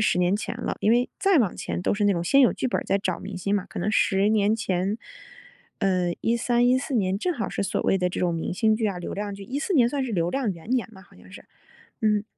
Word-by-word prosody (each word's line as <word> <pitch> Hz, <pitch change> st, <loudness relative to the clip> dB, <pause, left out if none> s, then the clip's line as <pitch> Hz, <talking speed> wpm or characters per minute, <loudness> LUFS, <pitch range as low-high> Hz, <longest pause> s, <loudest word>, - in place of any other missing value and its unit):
10 215 Hz, -, +2 dB
年 180 Hz, +2 st, +2 dB
前 220 Hz, +2 st, -4 dB
了， 235 Hz, -, -2 dB
因 210 Hz, -, +2 dB
为 240 Hz, +2 st, +2 dB
再 390 Hz, -1 st, +3 dB
往 225 Hz, -, +2 dB
前 -, -, -4 dB
都 -, -, +1 dB
是 205 Hz, 0 st, 0 dB
那 200 Hz, -2 st, +3 dB
种 170 Hz, -, -2 dB
先 275 Hz, +10 st, +4 dB
有 255 Hz, -, +6 dB
剧 -, -, -2 dB
本 255 Hz, -, 0 dB
儿 -, -, -6 dB
再 195 Hz, -, +1 dB
找 200 Hz, -, -2 dB
明 200 Hz, -, -7 dB
星 200 Hz, +3 st, -1 dB
嘛。 200 Hz, -3 st, -1 dB
可 -, -, -8 dB
能 190 Hz, +4 st, 0 dB
10 195 Hz, 0 st, +3 dB
年 215 Hz, 0 st, +2 dB
前， 190 Hz, -1 st, -1 dB, 0.8 s
呃， 185 Hz, -3 st, +1 dB
2013，2014 245 Hz, +4 st, +1 dB
年， 195 Hz, -4 st, +1 dB
正 355 Hz, -, -1 dB
好 225 Hz, -, -3 dB
是 -, -, -3 dB
所 -, -, -1 dB
谓 195 Hz, -, +2 dB
的 180 Hz, -, +1 dB
这 180 Hz, -, -5 dB
种 175 Hz, -2 st, +1 dB
明 165 Hz, -, -3 dB
星 220 Hz, +2 st, +3 dB
剧 220 Hz, 0 st, 0 dB
啊， 200 Hz, -3 st, -2 dB
流 175 Hz, -, -6 dB
量 205 Hz, 0 st, -4 dB
剧， 195 Hz, -, -9 dB
2014 285 Hz, -, -2 dB
年 250 Hz, -6 st, +5 dB
算 275 Hz, +3 st, -1 dB
是 250 Hz, -4 st, -3 dB
流 170 Hz, -2 st, 0 dB
量 265 Hz, -2 st, -1 dB
元 180 Hz, +5 st, -9 dB
年 255 Hz, -2 st, 0 dB
吧 190 Hz, -, -14 dB
好 200 Hz, -, -22 dB
像 -, -, -17 dB
是， -, -, -12 dB, 0.6 s
嗯。 210 Hz, -1 st, +2 dB
205 Hz, 265 characters per minute, -25 LUFS, 190-240 Hz, 0.8 s, 有